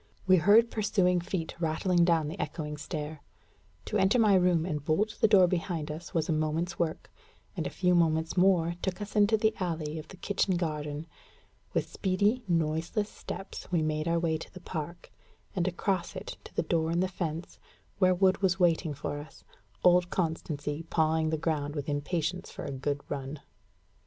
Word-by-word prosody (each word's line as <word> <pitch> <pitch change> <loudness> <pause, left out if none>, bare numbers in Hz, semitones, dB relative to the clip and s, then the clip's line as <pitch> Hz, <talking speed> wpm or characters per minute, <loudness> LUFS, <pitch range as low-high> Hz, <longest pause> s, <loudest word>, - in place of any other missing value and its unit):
We 185 -1 +6
heard 210 +7 +5
pursuing 190 -4 +2
feet 175 -2 -3
rattling 170 +2 +2
down 165 -3 +2
the 155 - -6
echoing 150 -3 -3
stair. 150 -1 -5 0.6
To - - -1
enter 195 +6 +4
my 215 -4 +5
room 180 -3 +3
and 150 -5 -3
bolt 195 +8 +1
the 220 - +6
door 200 -4 +7
behind 170 -3 -2
us 160 +2 -7
was 160 -2 0
a 165 - +1
moment's 155 +3 -1
work; 160 -2 -2 0.4
and - - -2
a - - -3
few 180 -1 +1
moments 160 -2 +2
more 180 -3 +4
took 190 0 -2
us 205 +1 -7
into 210 +1 +5
the 220 +1 +2
alley 160 -4 -2
of 155 - -9
the 190 - -12
kitchen 195 -1 0
garden. 150 -2 -3 0.7
With - - +1
speedy, 205 +6 +1
noiseless 165 +5 0
steps, 195 - -8
we 170 -3 +2
made 155 +1 -1
our 170 0 +2
way 165 -2 0
to - - -9
the 185 - -10
park, 170 -1 -6 0.4
and 180 -1 +1
across 185 0 -1
it - - -6
to - - -13
the - - +1
door 160 0 0
in 170 +1 +1
the 185 - +2
fence, 170 -3 -5 0.4
where 185 -2 +5
Wood 190 +1 +3
was 190 -1 +2
waiting 165 -3 +2
for 145 +1 -4
us, 150 - -12 0.4
old 180 0 +5
Constancy 155 -4 -2
pawing 160 0 +2
the 160 - 0
ground 150 -2 -1
with 145 -2 -4
impatience 160 +4 -2
for - - -7
a - - -4
good 140 +2 -2
run. 140 +1 -5
170 Hz, 185 wpm, -29 LUFS, 155-185 Hz, 0.7 s, door